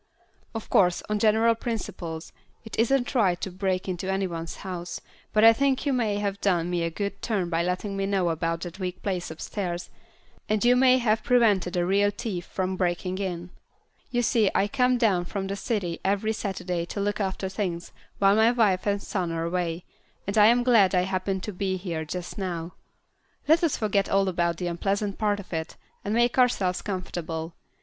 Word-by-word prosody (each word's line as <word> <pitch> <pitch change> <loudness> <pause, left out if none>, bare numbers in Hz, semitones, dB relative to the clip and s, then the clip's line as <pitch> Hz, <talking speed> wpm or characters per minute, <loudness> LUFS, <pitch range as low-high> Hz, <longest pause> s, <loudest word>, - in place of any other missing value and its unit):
Of 225 - -5
course, 180 -2 +3
on 210 0 0
general 225 +2 +4
principles, 175 -8 -5 0.3
it 220 - -7
isn't 245 +2 +2
right 190 -8 +2
to 190 - -3
break 185 0 -1
into 185 +1 -2
any 195 0 0
one's 165 -2 -5
house, 175 -2 -5 0.3
but 215 - +3
I 225 0 +9
think 275 +3 +1
you 280 - +2
may 225 -5 +1
have 200 -1 -2
done 175 -3 +1
me 175 -1 0
a 165 - 0
good 200 +4 -4
turn 190 -6 -1
by 165 0 +1
letting 180 +3 -2
me 195 0 -1
know 190 -3 +1
about 165 +1 -1
that 175 +2 -7
weak 180 -1 -4
place 185 -3 -2
upstairs, 175 +2 -4 0.6
and 215 +1 +1
you 245 +1 +6
may 255 0 +5
have 225 -3 +1
prevented 205 -7 +3
a 175 - +2
real 200 +2 +3
thief 205 -4 -5
from 185 0 -2
breaking 180 +1 -1
in. 175 -2 -4 0.6
You 245 -2 0
see, 220 -3 +3
I 200 - +3
come 250 +1 +2
down 200 -7 +2
from 195 +2 -4
the 195 +1 -3
city 195 -5 -2
every 205 +3 +1
Saturday 185 -5 -3
to 200 - -5
look 205 +1 -1
after 190 -1 -2
things 185 -3 -3 0.3
while 195 0 +4
my 220 +1 +5
wife 210 -6 +2
and 200 0 +1
son 180 -4 -2
are 165 0 -2
away, 175 0 -2 0.4
and 200 - -2
I 210 -1 +7
am 240 +2 +4
glad 220 -7 +5
I 180 - +4
happened 190 0 -2
to 210 - -4
be 190 0 -1
here 170 -4 -4
just 180 +5 -6
now. 175 -3 -4 0.7
Let 320 +3 +4
us 330 - +2
forget 205 -2 +1
all 195 0 +3
about 170 -2 0
the 180 - -3
unpleasant 195 +3 -1
part 205 -2 +1
of 200 - -10
this, 160 -1 -4 0.3
and 205 +2 -1
make 240 +2 +2
ourselves 195 -8 +2
comfortable. 170 -4 -4
195 Hz, 195 wpm, -26 LUFS, 175-215 Hz, 0.7 s, I